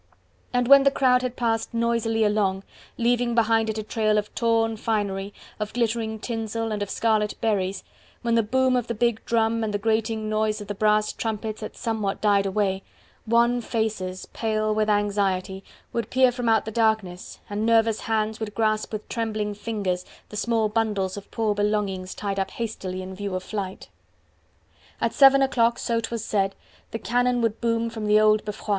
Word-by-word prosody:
And 245 -1 +1
when 275 +1 +9
the 275 - +5
crowd 255 -2 +3
had 250 -1 -3
passed 230 -1 -1
noisily 230 -1 +1
along, 200 -2 +1 0.3
leaving 240 0 +1
behind 225 -1 +3
it 220 - -2
a 215 - -3
trail 215 0 +1
of 210 0 -2
torn 225 -1 +1
finery, 205 -3 -2 0.3
of 210 0 -4
glittering 225 -1 -1
tinsel 225 0 -3
and 210 -1 -2
of 205 - -2
scarlet 215 -1 +1
berries, 195 -3 -1 0.4
when 235 -1 +1
the 230 - +4
boom 260 +4 +2
of 245 -2 0
the 235 - -3
big 235 0 0
drum 230 0 +1
and 215 - -1
the 205 - 0
grating 220 +1 0
noise 215 0 0
of 205 - -7
the 205 - -3
brass 210 +1 +2
trumpets 220 -1 -4
had 215 - -6
somewhat 215 -4 -2
died 200 -2 +3
away, 195 -1 0 0.5
wan 235 +2 +3
faces, 215 -6 -2
pale 215 -1 0
with 215 0 +1
anxiety, 195 -2 0 0.3
would 230 -1 -2
peer 255 -1 +4
from 245 -1 -2
out 220 -2 +3
the 220 - -4
darkness, 220 -5 0
and 205 +1 -3
nervous 225 -1 +3
hands 220 -1 -1
would 215 -2 -5
grasp 215 -1 0
with 215 -1 -5
trembling 215 -2 -2
fingers 200 -4 -2 0.3
the - - -9
small 225 0 +1
bundles 210 -3 -1
of 200 -1 -9
poor 220 -2 0
belongings 205 -3 -1
tied 200 -1 -3
up 190 0 -1
hastily 190 -5 -5
in 190 0 -7
view 200 0 -4
of 185 - -3
flight. 195 -2 -5 1.1
At - - 0
seven 275 -1 +7
o'clock, 235 -3 +2
so 230 -1 0
'twas 225 0 -4
said, 195 -2 0 0.3
the - - -4
cannon 245 +4 +1
would 225 -1 -1
boom 230 -1 0
from 220 -2 -4
the 210 0 +5
old 215 0 +4
Beffroi. 210 0 -7
220 Hz, 185 wpm, -25 LUFS, 205-230 Hz, 1.1 s, when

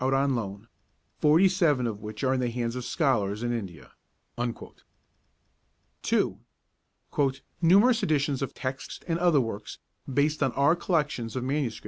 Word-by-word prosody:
out 135 +1 +2
on 135 0 +2
loan, 105 -2 -4 0.5
47 160 -4 +4
of 110 -3 -3
which 105 0 -7
are 130 0 +3
in 130 - 0
the 125 -1 0
hands 120 0 -3
of 125 - -4
scholars 115 - 0
in 120 0 0
India.' 95 -8 -7 2.1
2. - - 0 1.2
'Numerous 205 +8 +5
editions 145 -6 0
of 135 -1 -2
texts 130 0 -5
and 165 -1 0
other 175 -4 +4
works 105 -3 -5 0.3
based 145 +3 +1
on 130 - +2
our 140 +4 +3
collections 145 - -1
of 130 - -2
MSS. 135 -3 -1
135 Hz, 140 wpm, -27 LUFS, 115-155 Hz, 2.1 s, Numerous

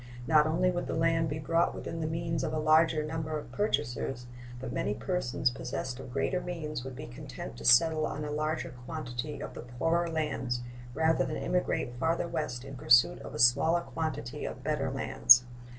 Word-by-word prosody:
Not 155 +1 +5
only 180 +3 +2
would 175 0 -3
the - - -2
land 165 0 +2
be 145 - -3
brought 165 +3 +1
within 165 - -5
the 155 - -1
means 165 -2 -2
of 155 - -1
a - - 0
larger 155 0 +4
number 155 0 -3
of 150 - -9
purchasers, 125 - -1 0.3
but 130 -1 -5
many 105 - -1
persons 120 0 -1
possessed 130 0 -5
of 135 -2 -9
greater 180 +8 0
means 155 -7 -5
would 130 -1 -7
be 150 +4 -7
content 125 -2 -8
to - - -9
settle 155 +6 +5
on 150 +1 -4
a 150 - -4
larger 155 +1 -2 0.2
quantity 150 -2 -5
of - - -6
the - - -7
poorer 165 +8 0
lands 140 -6 -2 0.3
rather 160 0 +3
than 155 - -3
emigrate 180 -8 -1
farther 165 +3 0
west 130 -6 -3
in 135 - -8
pursuit 125 -1 +5
of - - -9
a - - -5
smaller 140 +8 +5
quantity 155 -5 -4
of 130 - -6
better 140 -2 -1
lands. 125 -2 +6
155 Hz, 190 wpm, -30 LUFS, 125-160 Hz, 0.3 s, lands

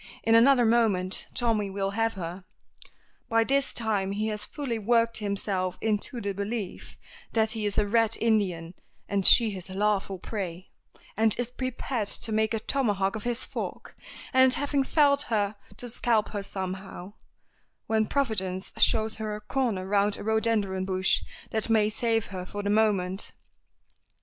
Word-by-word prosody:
In 225 - +3
another 245 +2 +6
moment 215 -5 +1
Tommy 225 -5 +1
will 195 0 -2
have 225 +2 0
her. 180 0 -6 0.9
By 230 -1 +3
this 275 +3 +1
time 205 -4 -1
he 215 +2 -1
has 210 -1 -1
fully 265 -7 -4
worked 230 +1 +2
himself 200 -3 -1
into 220 +3 -1
the 200 -2 -3
belief 200 0 -5 0.4
that 220 -1 +2
he 220 -2 -1
is 205 - -2
a 210 - +3
Red 225 +1 +3
Indian, 185 -7 0 0.3
and 200 -1 0
she 225 +3 +7
his 190 -2 -8
lawful 195 0 0
prey, 185 -2 -6 0.4
and 220 0 +3
is 245 0 -3
prepared 255 -3 -3
to 220 - 0
make 220 +1 +1
a - - -1
tomahawk 205 -6 0
of 215 - -6
his 240 0 -1
fork, - - -6 0.4
and 260 0 +6
having 285 -1 0
felled 285 0 +3
her, 210 -2 0 0.2
to 245 - -6
scalp 230 -2 +1
her 205 - -4
somehow, 190 0 -5 0.7
when 220 -1 +1
Providence 195 -9 -2
shows 220 0 +2
her 215 -1 -4
a 210 - -8
corner 210 -4 -1
round 200 +1 +1
a - - -7
rhododendron 220 -3 0
bush 190 0 +2 0.3
that 220 0 -1
may 215 -2 +3
save 225 0 0
her 185 -1 -5
for 205 +2 -6
the 205 - 0
moment. 200 -3 +2
215 Hz, 160 wpm, -27 LUFS, 195-230 Hz, 0.9 s, she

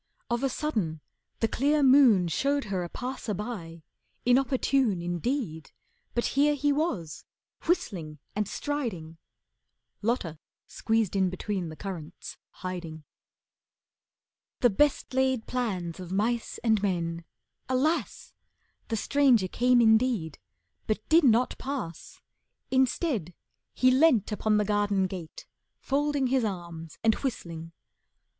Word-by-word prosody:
Of 240 0 +1
a 270 - +1
sudden, 215 - -2 0.4
the 225 - +3
clear 285 +6 +2
moon 255 -9 +6
Showed 280 - 0
her 180 -2 0
a 175 - -6
passer 250 -3 -4
by, 175 -6 -6 0.4
inopportune 255 -4 +2
Indeed, 175 - -3 0.5
but 240 - +1
here 290 +2 +4
he 290 +1 +1
was, 235 - -2 0.4
whistling 175 - -1 0.2
and 210 -1 0
striding. 200 - -4 0.8
Lotta 205 -9 -1 0.3
squeezed 225 -4 0
in 190 -1 +3
between 185 -1 -3
the 155 - -8
currants, 175 -3 -7 0.3
hiding. 170 -4 -5 1.6
"The 245 - +5
best 290 +5 +1
laid 260 -3 +1
plans 190 -9 -3
of 180 -1 -8
mice 225 +4 -1
and 220 -3 +3
men," 170 -4 -1 0.5
alas! 285 +6 0 0.5
The 225 - -1
stranger 255 -5 +3
came 245 +5 +3
indeed, 220 - +2 0.5
but 215 0 -2
did 325 +1 +6
not 245 0 +3
pass. 275 - -6 0.5
Instead, 260 - +1 0.4
he 255 0 +3
leant 260 -6 +4
upon 215 0 +1
the 210 - +2
garden 205 -2 +1
gate, 180 -4 -7 0.3
Folding 285 0 0
his 255 -1 +2
arms 170 -6 -5
and 225 -1 +5
whistling. 165 - -5
220 Hz, 120 wpm, -28 LUFS, 175-265 Hz, 1.6 s, moon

